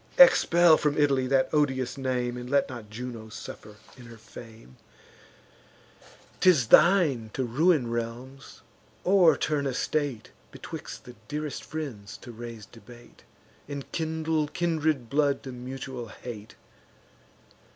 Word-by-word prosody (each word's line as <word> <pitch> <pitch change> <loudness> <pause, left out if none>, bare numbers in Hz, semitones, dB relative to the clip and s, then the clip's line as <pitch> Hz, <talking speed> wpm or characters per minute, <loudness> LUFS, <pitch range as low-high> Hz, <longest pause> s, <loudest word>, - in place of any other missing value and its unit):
Expel 175 - +7
from 150 -1 0
Italy 135 -3 +2
that 135 0 +2
odious 130 -4 +1
name, 125 -2 -2
And 125 0 -7
let 140 +1 +2
not 120 -5 -9
Juno 115 0 -7
suffer 105 -1 -10 0.2
in 125 -3 -13
her 115 0 -12
fame. 110 - -14 1.6
'Tis 155 -12 +4
thine 155 - +5
to 130 - -1
ruin 140 +3 +2
realms, 120 +3 -6 0.4
o'erturn 160 -6 +3
a 130 - -3
state, 145 -8 -2 0.2
Betwixt - - -9
the 125 - -12
dearest 150 0 -4
friends 130 -11 -7
to 120 - -11
raise 115 -2 -9
debate, 120 +2 -16 0.5
And 140 -1 -7
kindle 160 -1 -1
kindred 155 -6 -1
blood 140 +1 +1
to 130 - -7
mutual 125 -1 -7
hate. 110 -1 -10
130 Hz, 120 wpm, -27 LUFS, 120-150 Hz, 1.6 s, Expel